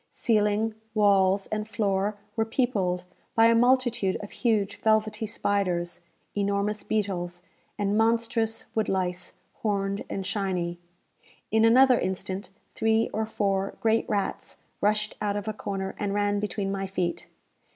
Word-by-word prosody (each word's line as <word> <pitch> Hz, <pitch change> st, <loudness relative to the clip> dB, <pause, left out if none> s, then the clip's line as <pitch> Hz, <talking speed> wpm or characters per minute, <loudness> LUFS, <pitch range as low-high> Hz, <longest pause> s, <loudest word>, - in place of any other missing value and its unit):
Ceiling, 215 Hz, -1 st, +1 dB, 0.2 s
walls, 195 Hz, -2 st, +4 dB
and 215 Hz, 0 st, -3 dB
floor 205 Hz, -1 st, 0 dB, 0.2 s
were 225 Hz, -, +2 dB
peopled 200 Hz, -7 st, 0 dB, 0.3 s
by 225 Hz, -, +6 dB
a 230 Hz, -, +6 dB
multitude 240 Hz, -4 st, +3 dB
of 205 Hz, -, -8 dB
huge 210 Hz, -5 st, 0 dB
velvety 215 Hz, 0 st, +1 dB
spiders, 185 Hz, -5 st, -1 dB, 0.3 s
enormous 200 Hz, +1 st, 0 dB
beetles, 180 Hz, -4 st, -2 dB, 0.3 s
and 205 Hz, 0 st, 0 dB
monstrous 225 Hz, 0 st, +1 dB
wood 220 Hz, -, 0 dB
lice, 180 Hz, -2 st, -2 dB, 0.3 s
horned 200 Hz, -2 st, -1 dB
and 195 Hz, -, -3 dB
shiny. 185 Hz, -4 st, -2 dB, 0.7 s
In 220 Hz, +1 st, +4 dB
an 225 Hz, -, +6 dB
another 260 Hz, -1 st, +6 dB
instant, 190 Hz, +1 st, -3 dB, 0.2 s
three 225 Hz, 0 st, +2 dB
or 220 Hz, 0 st, -1 dB
four 195 Hz, -2 st, -1 dB
great 225 Hz, 0 st, +1 dB
rats 200 Hz, -2 st, -2 dB, 0.2 s
rushed 215 Hz, +1 st, +1 dB
out 205 Hz, -1 st, 0 dB
of 205 Hz, +1 st, -5 dB
a 215 Hz, -, -1 dB
corner, 195 Hz, -2 st, -4 dB
and 205 Hz, -1 st, -1 dB
ran 205 Hz, 0 st, +1 dB
between 200 Hz, -1 st, -2 dB
my 195 Hz, 0 st, -2 dB
feet. 180 Hz, -2 st, -2 dB
205 Hz, 140 wpm, -27 LUFS, 195-220 Hz, 0.7 s, by